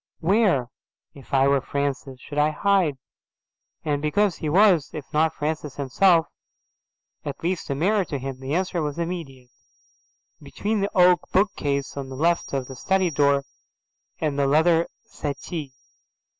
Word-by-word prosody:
"Where, 175 - +2 0.4
if 140 - -15
I 135 0 +4
were 140 -1 +3
Francis, 140 -1 -3
should 145 +2 -5
I 150 +1 +4
hide?"' 180 -3 +1 0.9
And 145 -2 0
because 185 +5 +1
he 155 - -3
was, 180 -3 +4
if 150 -3 -6
not 155 +1 +3
Francis 150 -1 -3
himself, 165 +5 +3 1.0
at - - -6
least 180 -1 -2
a 140 - -1
mirror 195 +7 +2
to 145 - -4
him, 135 0 -6
the 135 +3 -3
answer 185 -1 -1
was 150 -1 -3
immediate. 160 -8 -5 0.9
"Between 205 +9 -2
the 200 - 0
oak 180 0 +5
bookcase 145 -9 0
on 135 -1 -5
the 130 - -7
left 170 +5 +1
of 135 -2 -2
the 135 - -8
study 190 +5 +1
door, 140 -1 +2 0.8
and 150 -3 -1
the 140 - +2
leather 160 +3 +3 0.2
settee." 145 0 -5
150 Hz, 150 wpm, -24 LUFS, 140-180 Hz, 1.0 s, oak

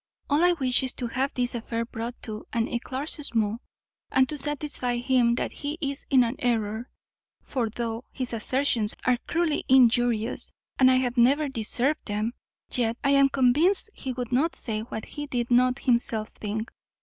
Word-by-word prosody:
All 295 +4 +4
I 355 0 +5
wish 260 -6 +2
is 260 -2 -2
to 250 - -4
have 260 +4 -1
this 245 -1 0
affair 230 0 -3
brought 235 +1 -6
to 215 -1 -7
an 230 -2 +1
eclaircissement, 240 -3 -2 0.5
and 260 0 +4
to 300 - -2
satisfy 290 -4 -1
him 245 -1 +2
that - - -2
he 295 +2 -4
is 280 -2 -3
in 260 -2 +6
an 240 +3 -2
error; 225 -1 -1 0.5
for, 240 -5 -2
though 230 +1 -4
his 255 -2 -4
assertions 230 -1 +1
are 250 -1 +3
cruelly 330 -3 0
injurious, 240 -3 +4 0.3
and 260 -1 +7
I 260 - +5
have 255 -1 0
never 275 +5 +4
deserved 260 +5 -1
them, 215 +2 -1 0.4
yet 235 -2 +1
I 275 - +3
am 275 0 +5
convinced 295 - +2
he 265 - -5
would 245 -1 -5
not 285 +7 +2
say 220 -3 -3
what 220 -1 -6
he 295 0 -6
did 245 -3 -2
not 250 +1 +4
himself 235 -3 0
think. 215 +1 -5
245 Hz, 175 wpm, -26 LUFS, 230-275 Hz, 0.5 s, and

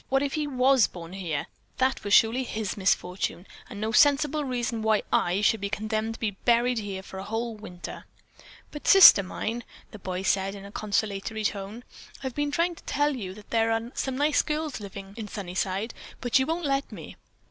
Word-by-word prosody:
What 270 +1 +2
if 280 - -2
he 305 -2 -1
was 260 -4 +4
born 170 0 -10
here? 170 -7 -3 0.3
That 260 +1 +1
surely 225 +4 +5
was 255 - -6
his 215 -3 -3
misfortune, 185 -2 -1 0.2
and 205 - -8
no 220 +1 -1
sensible 295 +3 +4
reason 240 -3 -2
why 220 -1 +2
I 180 +3 +2
should 215 0 +2
be 200 - -2
condemned 215 +2 -2
to - - -13
be 220 -2 -1
buried 235 +4 +2
here 195 -2 -5
for 190 - -9
a - - -5
whole 225 +3 -3
winter." 185 -5 -9 0.7
"But, 295 - -8
Sister 385 - +10
mine," 225 +5 -4 0.3
the 215 - -10
boy 185 0 -4
said 195 +1 +1
in 200 0 -10
a 200 - -10
conciliatory 215 +1 -2
tone. 205 +3 -3 0.4
"I've 260 -2 -3
been 290 +2 -1
trying 335 +4 +1
to - - -15
tell 290 0 +1
you 190 -6 -6
that 210 -1 -15
there 225 0 +2
are 225 +1 -2
some 265 -1 -3
nice 295 +1 +3
girls 305 -3 -3
living 195 -1 -9
in 220 -2 -5
Sunnyside, 195 +2 -3 0.3
but 245 +1 +2
you 265 - 0
won't 330 +1 -2
let 275 0 0
me. - - -9
220 Hz, 200 wpm, -27 LUFS, 195-265 Hz, 0.7 s, Sister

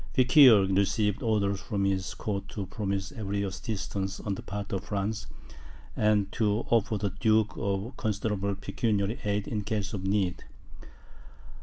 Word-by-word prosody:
Feuquieres 130 -7 +7
received 105 +1 +1
orders 100 -3 +1
from 100 -3 -1
his 95 -2 -1
court 100 -2 -3
to 100 -3 -4
promise 95 0 -3
every 100 -2 -3
assistance 95 -1 -4
on 100 - -3
the - - -6
part 100 +1 -5
of 95 -1 -2
France, 105 +1 -2 0.7
and 105 -2 +2
to 105 0 0
offer 110 -1 +2
the 100 -1 -2
duke 110 -1 +3
a 100 +4 -2
considerable 105 -2 -1
pecuniary 105 +1 -1
aid 105 0 0
in 105 -3 -2
case 105 0 -2
of 95 -3 -4
need. 95 -2 0
100 Hz, 145 wpm, -28 LUFS, 100-110 Hz, 0.7 s, Feuquieres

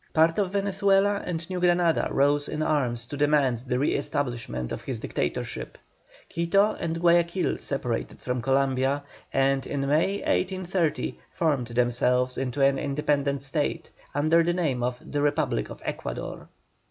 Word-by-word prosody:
Part 165 +3 +4
of 195 -3 +1
Venezuela 200 0 +2
and 170 -2 -3
New 185 -1 -3
Granada 175 -2 +3
rose 145 +1 +2
in 155 0 -2
arms 125 -7 0
to 130 - -7
demand 140 -4 +2
the 125 - 0
re 140 - +1
establishment 120 - -2
of - - -4
his - - -4
dictatorship. - - -3 0.5
Quito 195 +5 +2
and 165 0 -2
Guayaquil 170 +1 +2
separated 125 -4 -3
from 125 -1 -2
Columbia, 135 +2 +1 0.3
and 135 0 +1
in 140 - -2
May, 150 +7 +2
1830, 185 -3 -1
formed 145 -7 0
themselves 125 +1 +1
into 135 +1 -2
an 135 0 +4
independent 140 -1 0
State, 150 +4 -2 0.2
under 155 +3 +4
the 170 +1 +1
name 155 -9 0
of 125 0 -1
THE 145 - -2
REPUBLIC 145 -4 0
OF - - -10
ECUADOR. - - -5
145 Hz, 145 wpm, -26 LUFS, 130-170 Hz, 0.5 s, Part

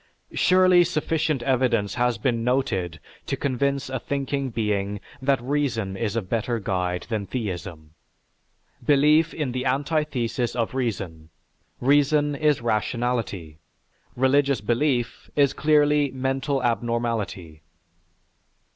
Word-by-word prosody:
Surely 185 -1 +5
sufficient 155 -4 -1
evidence 120 -6 +1
has 125 -1 +1
been 120 -4 0
noted 95 - -1 0.3
to - - -1
convince 140 0 -1
a 130 0 -3
thinking 140 +1 -2
being 105 -3 -1 0.2
that 135 0 +2
reason 125 -8 -1
is 105 +1 -2
a 115 - 0
better 115 +5 -1
guide 90 -4 -2
than 105 -4 -2
theism. 90 -9 -5 0.9
Belief 150 +3 +4
is 150 -5 -2
the 125 +1 -2
antithesis 135 -4 -1
of 115 -1 -1
reason; 95 -11 -3 0.5
reason 145 +2 +3
is 150 -3 +2
rationality; 110 -7 -2 0.6
religious 135 0 +3
belief 120 +3 -1
is 140 -2 +3
clearly 150 -1 +3
mental 135 +1 -1
abnormality. 115 -9 -2
125 Hz, 110 wpm, -24 LUFS, 110-140 Hz, 0.9 s, Surely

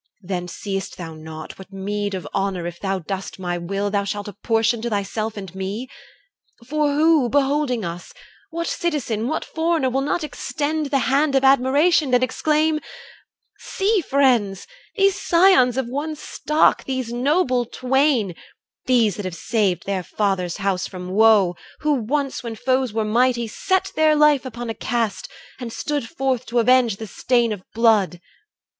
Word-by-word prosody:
Then 180 -1 -3
seest 195 +2 -5
thou 165 -2 -7
not 155 +1 -9
What 190 0 -12
meed 200 +1 -3
of 180 -6 -6
honour, 195 -3 -1
if 175 0 -6
thou 195 -1 -1
dost 190 +2 -5
my 175 -2 -3
will, 195 +4 -2
Thou 200 0 +1
shalt 205 +1 -4
apportion 225 +3 0
to 235 - -2
thyself 215 +1 -2
and 190 -3 -7
me? 195 +6 -4 0.8
For 300 +2 0
who, 310 -4 +4
beholding 275 -4 +1
us, 170 +1 -7 0.4
what 335 +1 -3
citizen, 260 -11 -2
What 315 - -2
foreigner, 320 -5 0
will 265 +2 0
not 295 +4 -1
extend 305 0 -2
the 275 0 +1 0.2
hand 285 0 +3
Of 270 - +3
admiration, 275 +3 +4
and 250 - +3
exclaim, 305 +3 +1 0.8
'See, 400 +1 0
friends, 245 - +2 0.3
These 395 -1 +2
scions 335 -9 +4
of 265 - 0
one 290 +6 -3
stock, 300 +1 +1
these 260 -3 -3
noble 255 -1 +1
twain, 255 - +1 0.5
These 230 -6 +3
that 205 - -5
have 185 -2 -4
saved 200 -3 0
their 195 -2 -1
father's 185 -2 -1
house 195 -3 -1
from 180 -1 -8
woe, 205 -3 +4 0.3
Who 300 - +1
once 275 +2 -1
when 230 -2 -6
foes 255 +1 0
were 220 0 -1
mighty, 240 +2 +2
set 375 - -1
their 310 -1 +4
life 300 -3 +4
Upon 240 -1 -6
a 225 - -2
cast, 225 -1 -2 0.3
and 240 -2 -6
stood 290 -2 -3
forth 265 -5 -1
to 240 - -2
avenge 240 -2 +4
The 220 - -7
stain 235 +3 +1
of 205 -3 -4
blood! 215 -6 +3
235 Hz, 160 wpm, -22 LUFS, 200-285 Hz, 0.8 s, who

